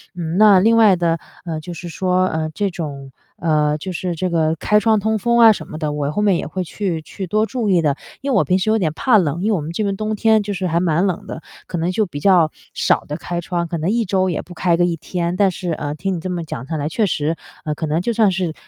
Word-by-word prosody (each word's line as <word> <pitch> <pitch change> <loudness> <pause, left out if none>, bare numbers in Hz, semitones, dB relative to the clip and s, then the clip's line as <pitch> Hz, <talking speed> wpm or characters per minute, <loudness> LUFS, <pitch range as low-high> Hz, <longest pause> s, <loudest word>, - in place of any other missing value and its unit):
嗯， 170 0 -3
那 205 -3 +7
另 225 +4 +4
外 215 -4 +6
的， 170 -1 0 0.3
呃， 160 -2 -3
就 175 +2 -8
是 175 +2 -8
说， 185 +2 +1
呃， 160 -1 -2
这 205 -1 -1
种， 140 -5 -6 0.3
呃， 150 -2 +1
就 185 +4 -6
是 180 0 -3
这 185 +3 -1
个 160 -1 +1
开 210 +6 +2
窗 220 -1 +3
通 220 +1 0
风 235 +3 +2
啊 225 -1 +9
什 210 - -4
么 155 - -7
的， 150 -2 -2
我 145 0 -2
后 210 - -1
面 200 -3 +4
也 - - -4
会 185 - -3
去 175 -2 -3
去 190 +3 -7
多 215 +4 +1
注 230 -2 -2
意 180 -3 +4
的。 145 -2 +2 0.3
因 275 0 -2
为 - - +3
我 - - +4
平 185 - +2
时 200 - 0
有 220 - +3
点 165 -6 0
怕 240 +5 +3
冷， 165 -1 -1
因 220 - +1
为 210 - +3
我 160 - -2
们 155 +3 -5
这 210 +5 -2
边 200 -1 -1
冬 215 +1 -2
天 220 0 +3
就 205 0 -3
是 185 0 -2
还 170 0 +1
蛮 175 +1 +1
冷 180 -4 -2
的， 160 - -7 0.3
可 175 - -4
能 170 +2 0
就 215 +3 +1
比 145 -5 -7
较 170 -2 +4 0.2
少 - - +2
的 150 - -5
开 175 0 -4
窗， 175 0 -2
可 170 0 -3
能 160 +4 -1
1 230 0 +1
周 185 0 +1
也 170 - -2
不 180 - -12
开 175 -1 +1
个 175 - +3
1 175 -1 0
天。 170 +2 -3
但 195 0 +3
是， 180 -1 -4
呃， 145 -2 -3
听 190 +4 -2
你 - - -4
这 185 - -5
么 175 -2 -3
讲 130 -5 -6
下 160 - -3
来 145 +1 -2
确 215 +5 +1
实， 155 -3 -1 0.3
呃， 150 - -1
可 160 - -3
能 155 +2 0
就 235 +6 -1
算 215 -3 +3
是 180 -3 -2
180 Hz, 300 characters per minute, -19 LUFS, 160-200 Hz, 0.3 s, 啊